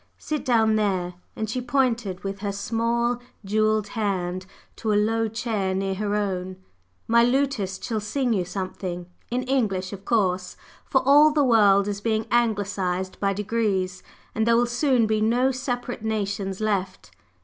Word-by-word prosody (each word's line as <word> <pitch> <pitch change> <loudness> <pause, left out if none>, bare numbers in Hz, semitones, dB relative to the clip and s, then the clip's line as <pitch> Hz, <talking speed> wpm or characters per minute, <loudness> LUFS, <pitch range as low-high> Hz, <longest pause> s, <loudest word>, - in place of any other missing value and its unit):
Sit 305 -1 -3
down 220 -3 +3
there," 185 -4 0 0.2
and 220 - -3
she 250 +4 -2
pointed 240 -7 0
with 195 0 -4
her 200 0 -2
small 235 +4 0 0.3
jewelled 215 0 +1
hand 185 -4 -2 0.3
to 220 - -1
a - - +3
low 225 +2 +2
chair 215 -4 -2
near 195 0 -1
her 205 +1 -1
own. 185 -3 -2 0.5
"My 235 +1 +5
lutist 245 -7 0
shall 225 -2 -1
sing 240 +4 -1
you 190 -4 +1
something, 180 -1 -5 0.2
in 250 +1 -1
English, 210 -8 0
of 195 -1 -8
course! 185 -5 0 0.3
for 265 - +1
all 295 +2 +8
the 295 -1 +2
world 205 -4 +5
is 200 -1 -3
being 220 0 0
Anglicized 200 -5 0
by 200 -1 +1
degrees, 200 -3 -1 0.3
and 220 +1 0
there 230 0 +5
will 240 - +4
soon 245 0 +2
be 215 0 +1
no 245 +4 +3
separate 245 -2 -4
nations 200 -3 -2
left. 195 - -2
215 Hz, 160 wpm, -24 LUFS, 195-235 Hz, 0.5 s, all